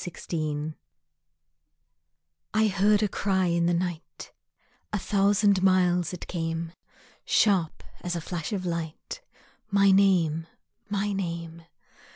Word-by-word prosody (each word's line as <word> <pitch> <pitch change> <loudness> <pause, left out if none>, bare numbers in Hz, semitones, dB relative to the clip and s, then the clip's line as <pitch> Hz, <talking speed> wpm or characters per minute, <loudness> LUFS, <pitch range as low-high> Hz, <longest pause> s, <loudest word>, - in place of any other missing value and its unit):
Message 155 -3 -4 1.8
I 220 0 +4
heard 205 +1 +3
a - - +3
cry 190 -1 0
in 170 -1 +1
the 175 - +2
night, 175 -2 -5 0.6
A 210 - 0
thousand 200 0 +2
miles 180 -2 +3
it 180 - -7
came, 165 -1 -3 0.5
Sharp 190 -7 +2 0.2
as 175 0 -2
a 170 - -3
flash 170 +2 -5
of 190 -3 -3
light, 170 - -5 0.5
My 200 -1 +4
name, 175 -5 +3 0.4
my 205 0 -1
name! 170 -3 -5
180 Hz, 115 wpm, -27 LUFS, 165-200 Hz, 1.8 s, I